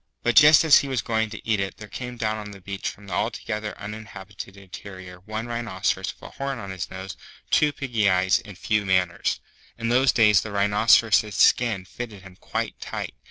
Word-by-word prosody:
But 120 -2 +1
just 150 +7 +8
as 160 -3 +7
he 140 - -3
was 130 -4 -1
going 110 -1 0
to 110 0 -10
eat 110 -2 +2
it 95 0 -3
there 105 - -10
came 125 +2 -7
down 110 -2 -2
to - - -9
the 100 - -11
beach 100 +1 -4
from 100 - -13
the 95 - -7
Altogether 105 0 -3
Uninhabited 100 -2 -9
Interior 95 -1 -10
one 110 +4 -5
Rhinoceros 105 -5 -2
with - - -23
a - - -14
horn 135 -1 -2
on 100 -4 -7
his 95 -2 -5
nose, 95 0 -7 0.4
two 150 -1 +4
piggy 120 -8 0
eyes, 95 +4 +3
and 105 -4 -11
few 105 +1 0
manners. 95 -3 0 0.4
In 115 -1 -2
those 130 +2 +4
days 105 -4 +5
the 110 - -7
Rhinoceros's 105 +1 +3
skin 110 -4 +3
fitted 105 -1 -8
him 95 -1 -13
quite - - -4
tight. - - -5
105 Hz, 200 wpm, -24 LUFS, 95-115 Hz, 0.4 s, just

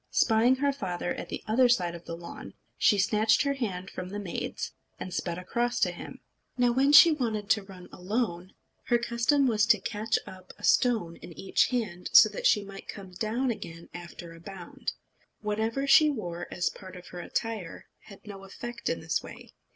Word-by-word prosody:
Spying 230 +3 +4
her 280 +1 +1
father 180 -8 -3
at - - -7
the - - -5
other 245 +3 +4
side 180 -8 +2
of 170 0 -10
the 165 - -6
lawn, 170 0 -10 0.2
she 205 - +4
snatched 215 +5 +3
her 280 -1 +1
hand 195 -9 -4
from 180 - -6
the 205 - -5
maid's, 195 -4 -4 0.3
and 185 - -6
sped 170 -1 -2
across 240 +7 -1
to - - +3
him. - - -10 0.4
Now 245 -1 +3
when 270 +4 +3
she 330 +3 +10
wanted 220 -8 -1
to 215 - +4
run 190 -2 -12
alone, 185 -2 -3 0.3
her 240 - +3
custom 235 +4 +2
was 220 -3 +2
to 215 -2 +5
catch 215 +3 -1
up 185 -1 -12
a - - -18
stone 215 -10 +2
in 170 - -11
each 195 - +2
hand, 210 -8 -3
so 215 - +9
that 205 - 0
she 210 - +3
might 195 -1 -11
come 195 -2 -8
down 230 +7 -1
again 170 -6 -8
after 170 -1 -9
a 165 - -13
bound. 180 0 -7 0.5
Whatever 220 +5 -1
she 300 +2 +7
wore 175 -10 -4
as 175 - 0
part 185 -2 -12
of 180 0 -11
her 180 - -8
attire 215 -1 -4 0.2
had 200 0 -14
no 200 -2 -9
effect 235 +5 -6
in - - -2
this - - -1
way. - - -12
210 Hz, 195 wpm, -28 LUFS, 180-240 Hz, 0.5 s, she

